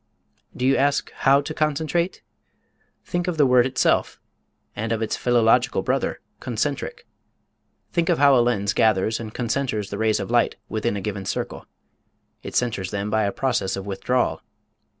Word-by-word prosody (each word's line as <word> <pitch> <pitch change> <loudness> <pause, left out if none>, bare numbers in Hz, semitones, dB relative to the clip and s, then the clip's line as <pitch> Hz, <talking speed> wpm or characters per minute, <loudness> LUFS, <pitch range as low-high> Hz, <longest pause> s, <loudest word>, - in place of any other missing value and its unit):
Do 125 - -1
you 135 +1 +4
ask 140 +1 +1
how 140 +1 +3
to 150 +2 -6
concentrate? 155 +4 -1 0.8
Think 175 +1 -2
of 175 -3 -2
the 145 - +5
word 125 -1 +4
itself, 130 - +1 0.6
and 110 +2 -3
of 115 0 0
its 110 - -1
philological 120 0 +2
brother, - - -1 0.2
concentric. - - -3 0.9
Think 170 0 0
of 170 - +3
how 140 -1 +6
a 120 - +5
lens 105 -5 +1
gathers 110 0 +2
and 110 -2 -6
concenters 115 -3 -2
the 100 - -4
rays 110 -1 +2
of 100 +3 -5
light 120 -1 +2
within 110 -1 -2
a - - -4
given 100 -1 -4
circle. - - -4 0.7
It - - -8
centers 105 -7 0
them 100 +1 -3
by 110 -1 +2
a 100 - 0
process 125 -7 -1
of 95 0 -6
withdrawal. 115 +6 -1
120 Hz, 165 wpm, -23 LUFS, 105-135 Hz, 0.9 s, how